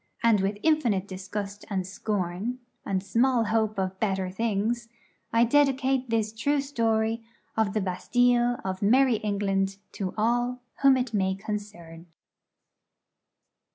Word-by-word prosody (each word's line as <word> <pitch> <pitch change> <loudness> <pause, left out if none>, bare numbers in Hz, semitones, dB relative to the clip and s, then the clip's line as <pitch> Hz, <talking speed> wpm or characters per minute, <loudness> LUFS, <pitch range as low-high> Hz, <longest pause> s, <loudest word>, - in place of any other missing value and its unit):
And, 225 -4 +4
with 200 +2 -1
infinite 240 -12 +2
disgust 200 +2 -6
and 190 -3 -1
scorn, 200 +3 -3 0.3
and 190 -1 -1
small 235 +4 +2
hope 220 -1 0
of 190 0 -2
better 190 -3 -1
things, 225 +3 -1 0.4
I 230 +1 +4
dedicate 265 0 +2
this 220 -1 0
true 285 +6 +1
story 230 -4 0 0.3
of 220 -3 +1
the 215 - 0
Bastilles 240 +6 +2
of 190 0 -3
merrie 245 +2 +4
England 195 -2 0
to 190 -2 -4
all 240 +3 0 0.2
whom 275 -1 +6
it 250 -2 -2
may 190 -2 +1
concern. 190 -5 -7
215 Hz, 125 wpm, -27 LUFS, 195-240 Hz, 0.4 s, whom